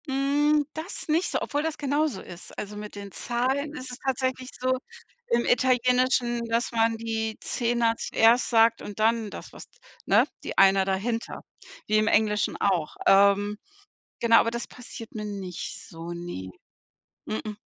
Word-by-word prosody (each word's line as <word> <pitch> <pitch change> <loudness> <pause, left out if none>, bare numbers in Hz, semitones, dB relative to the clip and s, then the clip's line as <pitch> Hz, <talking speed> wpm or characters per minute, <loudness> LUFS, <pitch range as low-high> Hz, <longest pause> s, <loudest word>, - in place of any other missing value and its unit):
Hm, 290 +2 +2
das 320 +6 -6
nicht 325 +4 +2
so, - - 0
obwohl 290 - -1
das 320 -1 -2
genauso 290 -6 0
ist. 175 - -12
Also, 210 0 -5
mit 210 0 -8
den 200 -1 -8
Zahlen 260 - -1
ist 255 -3 -7
es 250 - -8
tatsächlich 260 -1 -2
so 255 0 +1 0.5
im 235 - +1
Italienischen, 250 -1 +2
dass 230 +2 0
man 225 -1 +2
die 220 -1 -3
Zehner 235 -1 0
zuerst 230 +2 +3
sagt 230 -1 +4
und 205 0 -8
dann 225 0 +2
das - - -10
was - - -10 0.4
ne, - - +5 0.2
die - - -6
Einer 195 0 +6
dahinter, 215 +5 -2 0.5
wie 215 - +3
im 215 0 +2
Englischen 210 -1 +2
auch. 180 -6 0
Ähm, 200 +1 +4 0.6
genau, 230 -1 +6
aber 230 - +3
das 235 0 -4
passiert 240 0 -10
mir 215 -2 -5
nicht 195 -4 -6
so, 165 +1 -8
ne. 170 - -6 0.8
M-m. 215 -1 -4
230 Hz, 155 wpm, -26 LUFS, 210-255 Hz, 0.8 s, Einer